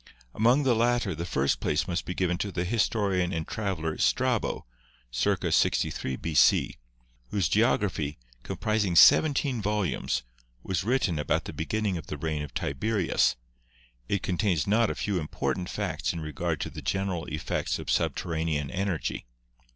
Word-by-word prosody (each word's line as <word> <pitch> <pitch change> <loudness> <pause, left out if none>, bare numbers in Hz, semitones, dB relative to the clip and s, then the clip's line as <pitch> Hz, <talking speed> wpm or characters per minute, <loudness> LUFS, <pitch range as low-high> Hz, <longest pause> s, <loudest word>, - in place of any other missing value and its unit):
Among 120 +6 +3
the 130 -3 +3
latter 120 -3 +1
the 85 +3 -5
first 70 -3 +1
place 75 +2 0
must 90 -1 -2
be 90 - -4
given 90 -1 0
to 100 - -2
the 90 -1 -2
his 105 +3 +2
torian 95 -5 0
and 80 -2 -3
traveler 90 -8 -3
Strabo - - +1 0.5
(circa 60 - 0
63 65 - +1
B.C.), 75 +2 +3 0.5
whose 95 -6 +1
geogra 105 -1 +2
phy, 75 -2 -4 0.2
comprising 105 - -1
seventeen 140 - +5
volumes, 105 -13 -1 0.4
was 95 -3 -1
written 105 - +1
about 75 - 0
the - - -6
beginning 100 +3 -1
of - - -11
the 75 - -5
reign 75 0 -2
of 75 - -8
Tiberius. 95 +6 +1 0.7
It 100 - 0
contains 90 -5 +1
not 110 +2 +3
a - - -2
few 100 -3 -1
important 90 +3 -3
facts - - -2
in 85 - -4
regard 80 +1 -3
to - - -3
the - - -8
general 95 -3 -1
effects 75 0 -2
of - - -4
subter - - 0
ranean 80 -3 -1
energy. 95 -9 -2
90 Hz, 160 wpm, -28 LUFS, 80-105 Hz, 0.7 s, seventeen